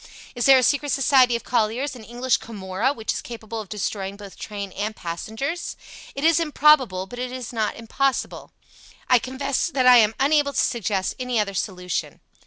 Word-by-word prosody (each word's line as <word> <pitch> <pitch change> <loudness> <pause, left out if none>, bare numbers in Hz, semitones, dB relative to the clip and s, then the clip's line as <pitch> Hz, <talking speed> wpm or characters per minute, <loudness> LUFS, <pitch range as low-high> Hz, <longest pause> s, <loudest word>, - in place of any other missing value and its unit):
Is 240 0 0
there 270 -1 +8
a 255 - +3
secret 285 +3 +1
society 260 -3 +4
of 235 - -4
colliers, 245 +4 0
an 240 - -11
English 245 +2 0
Camorra, 205 +3 -2
which 225 -6 -3
is - - -4
capable 225 -1 -7
of 205 - -12
destroying 200 -1 -4
both 200 -2 -11
train 200 -2 -6
and 210 +3 -4
passengers? 220 - -5 0.4
It 275 - -4
is 330 +1 +4
improbable, 295 - +3
but 245 +5 -10
it 250 0 -3
is 250 -2 -6
not 220 -2 -1
impossible. 265 +4 -2 0.6
I 250 -1 +5
confess 265 +4 -2
that 275 -7 0
I 250 -1 +9
am 220 -1 +4
unable 285 +1 +2
to - - 0
suggest 205 -5 0
any 250 -2 -1
other 200 -1 -1
solution. 180 -2 -3
240 Hz, 185 wpm, -23 LUFS, 210-270 Hz, 0.6 s, I